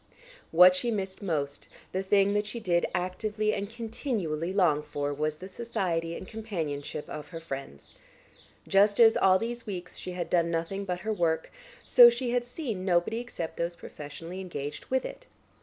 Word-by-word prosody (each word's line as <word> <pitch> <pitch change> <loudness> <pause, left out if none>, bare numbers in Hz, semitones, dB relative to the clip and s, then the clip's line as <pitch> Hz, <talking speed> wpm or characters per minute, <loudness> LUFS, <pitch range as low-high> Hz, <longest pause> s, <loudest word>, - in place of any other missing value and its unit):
What 180 +2 +8
she 235 +6 0
missed 195 -4 -3
most, 145 -7 -2 0.2
the 190 - -1
thing 195 +1 +3
that 205 0 0
she 235 +3 -5
did 175 -5 +1
actively 210 +4 -1
and 200 0 -3
continually 220 - -3
long 175 -7 +3
for 145 -1 -3
was 155 +1 -1
the 185 +5 -9
society 185 -6 -2
and 185 - -9
companionship 160 -10 -4
of 150 - -7
her 165 - -7
friends. 135 - -8 0.7
Just 200 +2 +4
as, 225 -1 +8
all 185 -1 +5
these 235 +3 -4
weeks, 180 -3 -6
she 180 - -6
had 175 -1 -3
done 170 -2 +2
nothing 170 +4 -2
but 180 -1 -3
her 220 0 -1
work, 165 -4 0 0.3
so 485 -1 +9
she 260 - -2
had 245 0 +1
seen 245 - -4
nobody 185 +4 +1
except 235 -9 -6
those 170 +1 -2
professionally 165 +5 -8
engaged 150 -5 -6
with 260 0 0
it. - - -8
185 Hz, 175 wpm, -29 LUFS, 165-215 Hz, 0.7 s, so